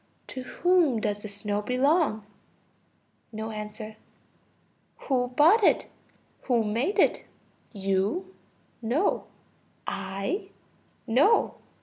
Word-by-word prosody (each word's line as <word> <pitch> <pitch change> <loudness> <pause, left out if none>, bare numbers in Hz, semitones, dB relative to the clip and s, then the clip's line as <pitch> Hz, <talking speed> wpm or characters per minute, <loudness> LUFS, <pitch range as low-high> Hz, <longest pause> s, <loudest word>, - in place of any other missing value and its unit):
To 260 - -5
whom 330 -2 +2
does 205 -1 -2
the 215 - -6
snow 205 0 -3
belong? 255 - +2 1.1
(No 220 0 -5
answer.) 215 0 -7 1.0
Who 250 -3 +1
bought 320 - +5
it? - - +3 0.6
Who 240 -3 +2
made 235 - -1
it? - - +3 0.5
You? 200 - -1 0.5
No. 255 - +1 0.6
I? 195 - -3 0.6
No. 275 - +4
235 Hz, 90 wpm, -27 LUFS, 210-300 Hz, 1.1 s, bought